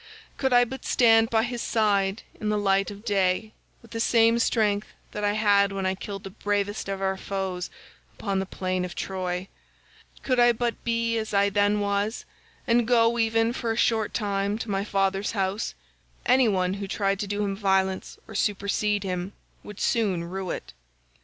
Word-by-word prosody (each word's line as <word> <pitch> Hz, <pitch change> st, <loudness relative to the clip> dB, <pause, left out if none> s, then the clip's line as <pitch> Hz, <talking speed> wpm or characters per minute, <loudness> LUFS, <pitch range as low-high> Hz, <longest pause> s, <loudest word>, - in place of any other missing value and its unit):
Could 265 Hz, -1 st, 0 dB
I 245 Hz, 0 st, +6 dB
but 265 Hz, +2 st, -8 dB
stand 225 Hz, -2 st, +4 dB
by 220 Hz, -1 st, +2 dB
his 240 Hz, 0 st, -3 dB
side, 205 Hz, -2 st, +1 dB, 0.2 s
in 215 Hz, -, -2 dB
the 210 Hz, -, +1 dB
light 195 Hz, -1 st, +2 dB
of 205 Hz, +2 st, -10 dB
day, 200 Hz, 0 st, +1 dB, 0.3 s
with 230 Hz, -, -17 dB
the 230 Hz, -, -4 dB
same 230 Hz, 0 st, +4 dB
strength 210 Hz, -3 st, +1 dB, 0.2 s
that 210 Hz, -, -5 dB
I 205 Hz, 0 st, +2 dB
had 205 Hz, -2 st, +3 dB
when 195 Hz, -1 st, -3 dB
I 190 Hz, -, +1 dB
killed 195 Hz, +1 st, -7 dB
the 195 Hz, -, -8 dB
bravest 205 Hz, 0 st, -2 dB
of 195 Hz, 0 st, -3 dB
our 190 Hz, 0 st, 0 dB
foes 190 Hz, -2 st, -3 dB, 0.5 s
upon 195 Hz, -2 st, -1 dB
the 190 Hz, -, -3 dB
plain 185 Hz, -1 st, -2 dB
of 180 Hz, -1 st, -5 dB
Troy—could 190 Hz, +7 st, -5 dB
I 240 Hz, 0 st, +6 dB
but 235 Hz, 0 st, -2 dB
be 230 Hz, -1 st, 0 dB
as 220 Hz, -1 st, -4 dB
I 200 Hz, 0 st, +3 dB
then 205 Hz, +1 st, +2 dB
was 200 Hz, +2 st, -1 dB, 0.4 s
and 235 Hz, -1 st, +2 dB
go 235 Hz, -1 st, +3 dB
even 225 Hz, +1 st, +2 dB
for 235 Hz, -2 st, -2 dB
a 225 Hz, -, -2 dB
short 220 Hz, -3 st, +2 dB
time 200 Hz, -1 st, -1 dB
to 225 Hz, -1 st, -5 dB
my 195 Hz, 0 st, 0 dB
father's 195 Hz, 0 st, 0 dB
house, 195 Hz, +1 st, -1 dB, 0.5 s
any 255 Hz, 0 st, +5 dB
one 185 Hz, -3 st, +1 dB
who 200 Hz, 0 st, -5 dB
tried 195 Hz, 0 st, 0 dB
to 205 Hz, -, -2 dB
do 205 Hz, +1 st, -1 dB
him 200 Hz, -1 st, -1 dB
violence 190 Hz, -1 st, 0 dB
or -, -, -10 dB
supersede 205 Hz, 0 st, 0 dB
him 185 Hz, 0 st, -3 dB, 0.3 s
would 210 Hz, -1 st, -10 dB
soon 200 Hz, -7 st, +1 dB
rue 185 Hz, +2 st, -5 dB
it. -, -, -5 dB
205 Hz, 185 wpm, -26 LUFS, 195-225 Hz, 0.5 s, I